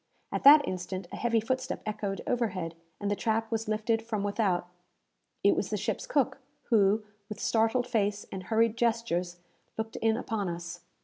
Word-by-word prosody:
At -, -, -2 dB
that 290 Hz, +1 st, +9 dB
instant, 185 Hz, 0 st, -4 dB
a -, -, -5 dB
heavy 235 Hz, -1 st, +1 dB
footstep 260 Hz, +3 st, -2 dB
echoed 210 Hz, -2 st, -3 dB
overhead, 185 Hz, -9 st, -1 dB, 0.3 s
and 205 Hz, 0 st, -1 dB
the -, -, +2 dB
trap 225 Hz, +1 st, -1 dB
was 225 Hz, -1 st, -1 dB
lifted 215 Hz, +1 st, +1 dB
from 220 Hz, -3 st, -3 dB
without. 200 Hz, -4 st, 0 dB, 0.8 s
It -, -, +5 dB
was -, -, -1 dB
the -, -, -1 dB
ship's -, -, -3 dB
cook, 275 Hz, -, +1 dB, 0.3 s
who, 210 Hz, -1 st, +4 dB, 0.3 s
with 210 Hz, -, -6 dB
startled 225 Hz, +2 st, +2 dB
face 205 Hz, -4 st, 0 dB
and 185 Hz, -1 st, -6 dB
hurried 225 Hz, +1 st, +2 dB
gestures, 225 Hz, -7 st, 0 dB, 0.4 s
looked 220 Hz, 0 st, -4 dB
in 225 Hz, 0 st, +2 dB
upon 215 Hz, -6 st, -2 dB
us. 170 Hz, 0 st, -6 dB
220 Hz, 170 wpm, -29 LUFS, 195-230 Hz, 0.8 s, that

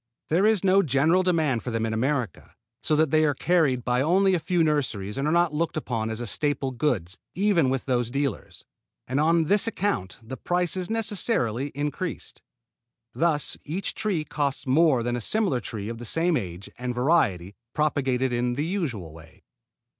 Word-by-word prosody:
There 180 Hz, +7 st, +3 dB
is 215 Hz, -4 st, +2 dB
no 195 Hz, +1 st, +5 dB
general 155 Hz, +4 st, +2 dB
demand 160 Hz, -10 st, +1 dB
for -, -, -5 dB
them 115 Hz, -1 st, -1 dB
in 110 Hz, -, -2 dB
America, 125 Hz, -, -2 dB, 0.3 s
so 155 Hz, -, +1 dB
that 155 Hz, -2 st, +2 dB
they 155 Hz, 0 st, +4 dB
are 145 Hz, -2 st, +2 dB
carried 150 Hz, -7 st, +1 dB
by 125 Hz, 0 st, +1 dB
only 190 Hz, +6 st, +3 dB
a 180 Hz, -, +2 dB
few 175 Hz, +1 st, +1 dB
nurseries 125 Hz, -10 st, -1 dB
and 135 Hz, +2 st, -1 dB
are -, -, +1 dB
not 170 Hz, -1 st, +2 dB
looked 160 Hz, +1 st, -1 dB
upon 115 Hz, -7 st, -2 dB
as 115 Hz, +1 st, -4 dB
staple 145 Hz, +4 st, -1 dB
goods 115 Hz, -, -2 dB, 0.2 s
even 185 Hz, -7 st, +2 dB
with 130 Hz, -1 st, -2 dB
those 120 Hz, -3 st, 0 dB
dealers; 140 Hz, -2 st, -4 dB, 0.4 s
and 130 Hz, +3 st, -1 dB
on 165 Hz, +2 st, +3 dB
this 200 Hz, +7 st, +2 dB
account 205 Hz, -, -2 dB
the 130 Hz, +4 st, -7 dB
price 175 Hz, -2 st, -1 dB
is 185 Hz, 0 st, -2 dB
necessarily 205 Hz, -, 0 dB
increased. 150 Hz, +5 st, -4 dB, 0.7 s
Thus 160 Hz, -3 st, +2 dB
each 180 Hz, +6 st, -4 dB
tree 195 Hz, -8 st, -1 dB
costs 145 Hz, -2 st, -2 dB
more 135 Hz, -2 st, +3 dB
than 120 Hz, +1 st, -1 dB
a 120 Hz, -, -3 dB
similar 195 Hz, -, +1 dB
tree 105 Hz, -3 st, -6 dB
of 115 Hz, 0 st, -6 dB
the 120 Hz, -, -7 dB
same 165 Hz, +7 st, +1 dB
age 95 Hz, -, -5 dB
and 125 Hz, -1 st, -3 dB
variety 120 Hz, -, +1 dB, 0.2 s
propagated 130 Hz, -4 st, 0 dB
in 120 Hz, 0 st, 0 dB
the 145 Hz, +5 st, -2 dB
usual 135 Hz, -, -3 dB
way. 80 Hz, 0 st, -16 dB
145 Hz, 180 wpm, -25 LUFS, 120-170 Hz, 0.7 s, no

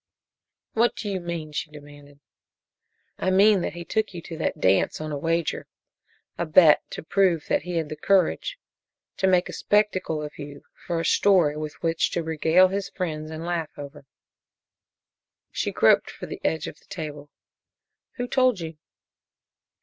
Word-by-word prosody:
"What 235 Hz, +2 st, +2 dB
do 215 Hz, -, -6 dB
you 195 Hz, -2 st, -2 dB
mean?" 170 Hz, -3 st, -5 dB
she 150 Hz, -, -4 dB
demanded. 145 Hz, -1 st, -14 dB, 1.0 s
"I -, -, 0 dB
mean 195 Hz, +1 st, +5 dB
that -, -, -3 dB
he 170 Hz, 0 st, -8 dB
took 215 Hz, -1 st, -1 dB
you 170 Hz, -, -5 dB
to 165 Hz, -, -8 dB
that -, -, -2 dB
dance 95 Hz, +1 st, +2 dB
on 155 Hz, 0 st, -5 dB
a -, -, -2 dB
wager 165 Hz, +1 st, -1 dB, 0.7 s
a 170 Hz, -, 0 dB
bet 155 Hz, -1 st, +6 dB
to -, -, -7 dB
prove 175 Hz, -2 st, +2 dB
that -, -, +2 dB
he 175 Hz, +3 st, -5 dB
had 160 Hz, -2 st, -2 dB
the 155 Hz, -, -5 dB
courage. 195 Hz, -, +1 dB, 0.6 s
To 190 Hz, -, +2 dB
make 180 Hz, -1 st, +3 dB
a -, -, -8 dB
spectacle 190 Hz, -7 st, 0 dB
of 150 Hz, -, -8 dB
you 145 Hz, -1 st, -9 dB, 0.2 s
for 170 Hz, -2 st, -1 dB
a 165 Hz, -, -2 dB
story 180 Hz, -7 st, +4 dB
with 155 Hz, 0 st, -5 dB
which 165 Hz, -1 st, +1 dB
to 170 Hz, -, -1 dB
regale 160 Hz, +3 st, +4 dB
his 195 Hz, +1 st, -3 dB
friends 155 Hz, -5 st, -4 dB
and 160 Hz, +1 st, -6 dB
laugh 170 Hz, -3 st, -2 dB
over." 145 Hz, -1 st, -10 dB, 1.4 s
She -, -, -2 dB
groped -, -, +4 dB
for -, -, -8 dB
the -, -, -8 dB
edge 160 Hz, -2 st, 0 dB
of -, -, -8 dB
the -, -, -27 dB
table. 150 Hz, -3 st, -7 dB, 0.8 s
"Who 245 Hz, -1 st, -4 dB
told 255 Hz, -5 st, +2 dB
you?" 160 Hz, -2 st, -7 dB
165 Hz, 170 wpm, -25 LUFS, 150-185 Hz, 1.4 s, bet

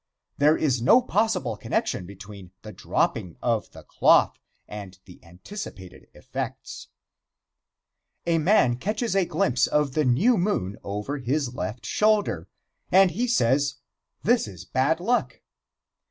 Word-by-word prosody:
There 150 Hz, +2 st, +4 dB
is 130 Hz, -6 st, 0 dB
no 130 Hz, -, +6 dB
possible 210 Hz, -, 0 dB
connection 90 Hz, -3 st, -2 dB
between 100 Hz, -1 st, -11 dB
the 110 Hz, -, -8 dB
dropping 85 Hz, -3 st, -2 dB
of 115 Hz, -3 st, -1 dB
the -, -, -14 dB
cloth -, -, +3 dB, 0.3 s
and 100 Hz, -3 st, -9 dB
the 90 Hz, -, -16 dB
anticipated 95 Hz, -, -10 dB
effects. -, -, -7 dB, 1.4 s
A 165 Hz, -1 st, +2 dB
man 150 Hz, -, +3 dB
catches 210 Hz, -, -2 dB
a 195 Hz, -2 st, +3 dB
glimpse 130 Hz, -6 st, +1 dB
of 150 Hz, -3 st, 0 dB
the 155 Hz, -, +1 dB
new 175 Hz, -, +3 dB
moon 140 Hz, -, -1 dB
over 105 Hz, +9 st, -4 dB
his 130 Hz, 0 st, -1 dB
left 115 Hz, -2 st, -5 dB
shoulder, 205 Hz, -, +1 dB, 0.4 s
and 190 Hz, 0 st, +6 dB
he 235 Hz, +9 st, -1 dB
says: 140 Hz, -, +2 dB, 0.5 s
"This 240 Hz, -, +2 dB
is 95 Hz, -3 st, -10 dB
bad 135 Hz, -, +1 dB
luck." 240 Hz, +7 st, -1 dB
135 Hz, 130 wpm, -25 LUFS, -, 1.4 s, no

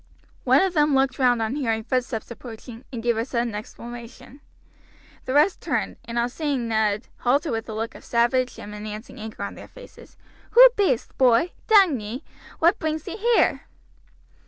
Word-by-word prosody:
One -, -, +5 dB
of 380 Hz, -2 st, 0 dB
them 300 Hz, -3 st, +3 dB
looked 265 Hz, -1 st, +1 dB
round 245 Hz, -3 st, +3 dB
on 220 Hz, +4 st, -2 dB
hearing 225 Hz, -6 st, -1 dB
footsteps 245 Hz, -1 st, -2 dB
approaching, 235 Hz, 0 st, -10 dB
and 235 Hz, -3 st, -6 dB
gave 235 Hz, -1 st, +1 dB
a 225 Hz, -, 0 dB
sudden 235 Hz, -2 st, -2 dB
exclamation. 240 Hz, +4 st, -9 dB, 0.8 s
The 255 Hz, -, -2 dB
rest 305 Hz, +6 st, +3 dB
turned, -, -, -2 dB
and 235 Hz, 0 st, -5 dB
on 235 Hz, 0 st, +2 dB
seeing 275 Hz, -3 st, -2 dB
Ned, 220 Hz, -1 st, 0 dB
halted 280 Hz, +6 st, +1 dB
with 225 Hz, 0 st, -3 dB
a -, -, -4 dB
look 225 Hz, +1 st, -3 dB
of -, -, -13 dB
savage 245 Hz, +2 st, +1 dB
and 205 Hz, -, -9 dB
menacing 210 Hz, +2 st, -8 dB
anger 220 Hz, 0 st, -7 dB
on -, -, -5 dB
their -, -, -11 dB
faces. -, -, -15 dB, 0.4 s
"Who -, -, +10 dB
be'est, 380 Hz, -, 0 dB
boy? 255 Hz, +7 st, +4 dB, 0.2 s
dang 385 Hz, -, +5 dB
ee, 215 Hz, +5 st, -6 dB, 0.3 s
what 340 Hz, +2 st, +3 dB
brings 315 Hz, -1 st, -3 dB
ye -, -, -4 dB
here?" 465 Hz, +2 st, +2 dB
245 Hz, 175 wpm, -24 LUFS, 225-290 Hz, 0.8 s, Who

